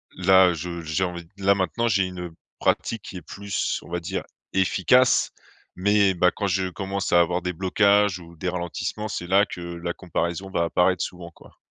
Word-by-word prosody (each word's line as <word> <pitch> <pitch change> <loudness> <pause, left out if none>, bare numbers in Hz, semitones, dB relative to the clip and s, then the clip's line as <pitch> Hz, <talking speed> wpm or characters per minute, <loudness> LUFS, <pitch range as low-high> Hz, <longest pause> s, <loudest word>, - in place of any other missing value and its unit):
là, 95 -1 +5
je 85 +1 -5
j'ai 80 +4 -1
envie, 85 -2 -4
là, 100 0 +3
maintenant 100 +5 0
j'ai 100 -3 +2
une 90 -2 -6 0.3
pratique 115 - 0
qui 95 - -8
est - - -8
plus, 100 +1 -3
on - - -14
va 90 - -1
dire, 85 - -4 0.3
efficace, 95 +7 +3 0.4
mais, 100 +1 +3
bah, 90 0 +3
quand 100 - -3
je 95 0 0
commence 95 0 -3
à 85 - +6
avoir 85 +1 +2
des 90 +1 -2
blocages 100 +1 +3
ou 85 -1 -14
des 90 - -4
ralentissements, 90 +4 -4
c'est 90 -3 -4
là 100 +3 +4
que 90 - -8
la 85 0 -5
comparaison 85 +1 -3
va 90 -3 0
apparaître 90 +1 +2
souvent, 90 -2 -7
quoi. - - -19
90 Hz, 190 wpm, -24 LUFS, 85-100 Hz, 0.4 s, à